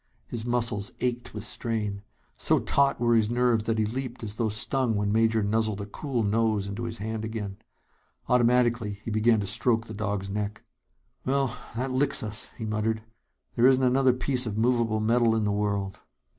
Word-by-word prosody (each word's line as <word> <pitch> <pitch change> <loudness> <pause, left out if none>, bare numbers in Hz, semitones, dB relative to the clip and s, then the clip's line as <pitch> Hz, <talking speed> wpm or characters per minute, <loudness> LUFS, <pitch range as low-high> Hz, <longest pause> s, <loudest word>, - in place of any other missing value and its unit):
His 115 -2 -3
muscles 115 -4 +1
ached 120 -1 -2
with 105 - -3
strain. 105 -4 -3 0.3
So - - +2
taut 140 0 +2
were 120 0 +3
his 110 -2 +3
nerves 120 -2 +2
that 115 -1 0
he 110 - +2
leaped 125 +2 -4
as 105 -2 -3
though 115 -2 +1
stung 115 +3 +1
when 100 0 0
Major 110 0 +2
nuzzled 110 0 0
a 100 - -4
cool 120 +3 -3
nose 110 -1 +1
into 100 +4 -4
his 115 0 -5
hand 110 +1 -4
again. 105 -3 -5 0.7
Automatically, 120 -4 +2
he 115 - -3
began 110 +1 +3
to - - -3
stroke 115 +3 +1
the 110 - -7
dog's 100 -2 -2
neck. 105 +1 -4 0.6
"Well, 135 -1 0 0.2
that 130 +3 -2
licks 135 0 +1
us," 110 0 -5
he 110 - -5
muttered. 110 +1 -1 0.5
"There 120 +2 +4
isn't 130 0 +4
another 130 0 +4
piece 125 0 +1
of 105 -1 -4
movable 115 -2 +2
metal 115 +1 +3
in 110 - +1
the 105 - +1
world." 100 -2 -1
110 Hz, 185 wpm, -27 LUFS, 105-120 Hz, 0.7 s, There